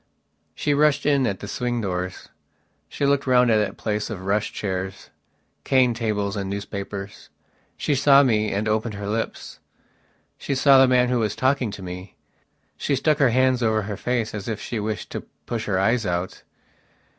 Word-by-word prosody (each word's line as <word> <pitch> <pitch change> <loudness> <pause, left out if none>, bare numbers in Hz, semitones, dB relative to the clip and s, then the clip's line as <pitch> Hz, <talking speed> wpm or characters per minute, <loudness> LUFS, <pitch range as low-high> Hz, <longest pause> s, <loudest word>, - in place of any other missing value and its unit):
She 145 - 0
rushed 150 0 +3
in 140 -3 +3
at 100 -3 -3
the 105 - -6
swing 120 +3 -2
doors. 90 -3 -4 0.6
She 140 - -2
looked 140 -1 +1
round 125 -2 +4
that 105 -2 +1
place 105 -1 -2
of 95 -4 -6
rush 100 +2 0
chairs, 95 -1 -5 0.5
cane 130 -2 +3
tables 105 -3 -2
and 100 -2 -3
newspapers. 100 0 -6 0.5
She 150 - 0
saw 140 +1 +6
me 110 -5 +1
and 105 +2 -1
opened 110 0 -1
her 100 0 -6
lips. 110 +2 -4 0.8
She 140 - -2
saw 135 0 +6
the 135 - +6
man 125 -1 +3
who 125 -1 +1
was 110 -2 -1
talking 130 -2 +1
to 100 -1 -8
me. 90 +1 -8 0.6
She 140 - 0
stuck 150 +3 +1
her 135 -3 +5
hands 130 +1 +2
over 110 -2 +1
her 105 +1 -4
face 120 0 -2
as 105 -2 -6
if 110 -2 -3
she 115 - -4
wished 105 0 -4
to - - -4 0.2
push 115 -2 -3
her 100 -3 0
eyes 115 +4 +2
out. 90 -1 -3
110 Hz, 180 wpm, -23 LUFS, 100-130 Hz, 0.8 s, saw